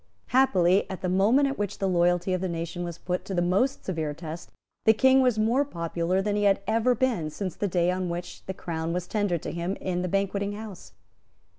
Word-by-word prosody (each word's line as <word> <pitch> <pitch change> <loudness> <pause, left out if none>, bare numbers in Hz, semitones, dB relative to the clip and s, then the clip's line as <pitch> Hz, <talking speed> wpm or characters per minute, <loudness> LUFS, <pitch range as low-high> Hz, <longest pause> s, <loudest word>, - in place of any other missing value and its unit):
Happily, 200 -8 +3
at 190 - -6
the 185 - -1
moment 215 +10 +4
at 275 -3 -4
which 205 -1 -2
the 195 - -1
loyalty 175 0 +2
of 185 - -1
the 190 - -1
nation 170 +1 -4
was 170 -2 -5
put 180 0 -3
to 195 - -4
the 175 - +2
most 200 +10 +1
severe 160 -5 -2
test, 165 +1 -8 0.3
the 220 - +7
King 265 +4 +5
was 250 -4 +2
more 230 +6 +3
popular 170 - -1
than 205 0 0
he 205 0 +1
had 195 -1 +4
ever 230 +3 +2
been 225 -11 0
since 185 +3 -5
the 205 - -1
day 175 -1 +1
on 185 -1 -2
which 175 +1 -6
the 190 - -3
Crown 165 -1 -3
was 180 0 -2
tendered 200 -5 -1
to - - -4
him 175 +3 -3
in 180 -1 -3
the 180 - -1
Banqueting 200 +2 -1
House. 210 -3 -9
185 Hz, 225 wpm, -26 LUFS, 175-210 Hz, 0.3 s, the